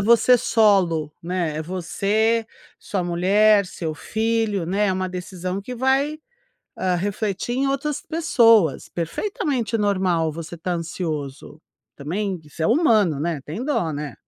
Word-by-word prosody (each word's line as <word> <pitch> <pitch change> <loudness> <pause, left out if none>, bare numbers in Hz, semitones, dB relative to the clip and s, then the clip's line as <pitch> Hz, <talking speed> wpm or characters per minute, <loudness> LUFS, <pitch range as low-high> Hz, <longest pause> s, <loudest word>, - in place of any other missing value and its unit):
você 235 +4 +5
solo, 190 -10 +2
né, 170 -3 -2
é 155 - -2
você, 205 +6 0 0.3
sua 195 -3 -3
mulher, 200 +4 +3
seu 165 -3 -5
filho, 220 -1 -1
né, 200 +4 +1
é - - +2
uma 185 0 -2
decisão 180 0 -5
que 250 +5 -6
vai, 270 +4 +1 0.6
hã, 185 -1 +1
refletir 200 +4 -2
em 270 +1 +1
outras 275 +2 -1
pessoas. 230 - +3
Perfeitamente 235 - -2
normal 185 -6 +1
você 165 +2 -7
tá 175 +2 -3
ansioso 155 -4 -5 0.4
também, 185 +6 -3
você 160 - -7
é - - +3
humano, 220 - +3
né, 160 0 -2
tem 185 +12 -5
dó, 180 - 0
né, 145 -1 -5
190 Hz, 140 wpm, -22 LUFS, 170-225 Hz, 0.6 s, você